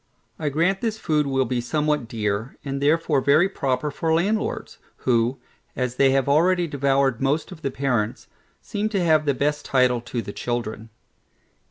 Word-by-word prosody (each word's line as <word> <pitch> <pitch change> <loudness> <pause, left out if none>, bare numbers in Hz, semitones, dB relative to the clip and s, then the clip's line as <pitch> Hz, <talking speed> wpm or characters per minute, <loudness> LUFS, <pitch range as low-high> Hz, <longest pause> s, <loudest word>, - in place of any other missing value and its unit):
I 155 -2 -1
grant 170 +7 +1
this 220 -2 -1
food 155 -7 0
will 135 -1 +1
be 125 0 -1
somewhat 150 0 0
dear, 110 +1 -3
and 140 0 -3
therefore 150 -1 +2
very 145 +7 +4
proper 140 -3 -1
for 160 +3 -2
landlords, 205 +6 -1 0.3
who, 120 +1 +2 0.4
as 125 -1 -2
they 135 - +5
have 135 0 +2
already 175 +5 +3
devoured 140 -4 +1
most 145 +6 0
of 170 -4 -10
the 140 - -1
parents, 125 -5 -1 0.4
seem 210 +1 -2
to 195 -5 0
have 155 -2 +3
the 140 - +2
best 150 +3 0
title 125 -2 +2
to 120 0 -4
the 100 - -7
children. 115 -2 -4
140 Hz, 170 wpm, -23 LUFS, 125-155 Hz, 0.4 s, they